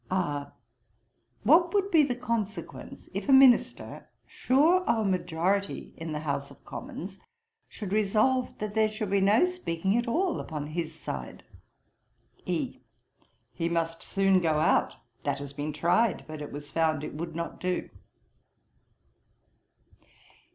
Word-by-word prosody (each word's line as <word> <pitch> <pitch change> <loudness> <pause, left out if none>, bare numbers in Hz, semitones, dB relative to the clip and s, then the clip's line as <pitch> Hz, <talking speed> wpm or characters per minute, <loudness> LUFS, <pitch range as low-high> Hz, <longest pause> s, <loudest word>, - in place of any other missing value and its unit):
R. 150 -7 -1 0.9
'What 340 - +5
would 400 0 +1
be 325 -3 +6
the 270 -4 +1
consequence, 225 -4 -4
if - - -4
a - - +6
Minister, 265 -2 +4 0.2
sure 320 +8 +3
of 220 -2 +2
a - - +2
majority 185 +2 -1
in 160 0 -6
the 150 0 -3
House 140 -2 -2
of - - -18
Commons, - - -7 0.5
should 205 -3 -6
resolve 215 +5 +2
that 210 -1 -4
there 220 0 +3
should 215 -2 -4
be 200 -1 +3
no 210 - +5
speaking 195 - -1
at 240 +1 -1
all 345 +8 0
upon 150 -3 -5
his 160 0 -4
side.' 65 - -6 1.0
E. - - -2 0.7
'He 165 - -1
must 165 -1 -1
soon 195 -1 +2
go 160 -3 +2
out. 155 - +2 0.3
That 140 -1 -1
has 140 0 -7
been 145 +2 -3
tried; 175 +7 +1
but 155 -1 -7
it 150 - -6
was 145 +1 -8
found 160 -2 +1
it - - -5
would 165 +2 -5
not 170 0 -5
do.' 180 0 -2
190 Hz, 145 wpm, -28 LUFS, 160-230 Hz, 1.0 s, be